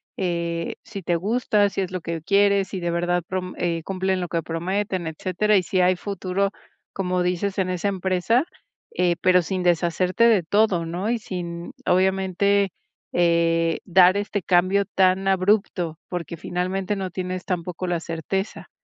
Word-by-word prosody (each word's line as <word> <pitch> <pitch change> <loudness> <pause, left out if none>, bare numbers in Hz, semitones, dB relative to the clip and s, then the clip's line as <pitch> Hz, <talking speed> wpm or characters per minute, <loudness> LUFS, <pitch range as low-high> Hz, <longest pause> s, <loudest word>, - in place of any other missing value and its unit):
eh, 170 -2 -2
si 225 -4 -7
te 170 0 +1
gusta, 210 +1 +2
si 195 - -3
es 185 - -3
lo 185 - -3
que 165 0 -4
quieres, 200 +1 +3
si 190 - -4
de 175 -1 -2
verdad 175 +1 0
prom 185 -1 -3
eh, 170 -2 -1
cumplen 190 +1 -1
lo 175 - -4
que 170 - -1
prometen, 185 +2 -2
etcétera, 190 +5 +1
y 185 - +2
si 185 +2 0
hay 180 0 +3
futuro, 195 0 -2 0.4
como 180 -1 -1
dices, 180 +2 -1
en 185 -1 0
esa 185 +2 -1
empresa, 190 - +1 0.5
eh, 175 -1 +2
pero 180 0 +5
sin 185 +2 -3
deshacerte 175 +3 +1
de 215 -5 +4
todo, 185 0 +2
¿no?, 175 +6 -3
y 240 - 0
sin, 175 -4 -6
obviamente, 190 +1 +2 0.4
eh, 165 -1 +2
dar 185 +1 +5
este 205 -2 -2
cambio 185 +2 +3
tan 190 0 +2
abrupto, 190 -4 +1
porque 170 -2 -5
finalmente 185 +4 -2
no 190 -2 -3
tienes 185 0 -4
tampoco 180 -1 -3
la 175 -1 0
certeza, 170 +5 -4
185 Hz, 160 wpm, -23 LUFS, 175-195 Hz, 0.5 s, pero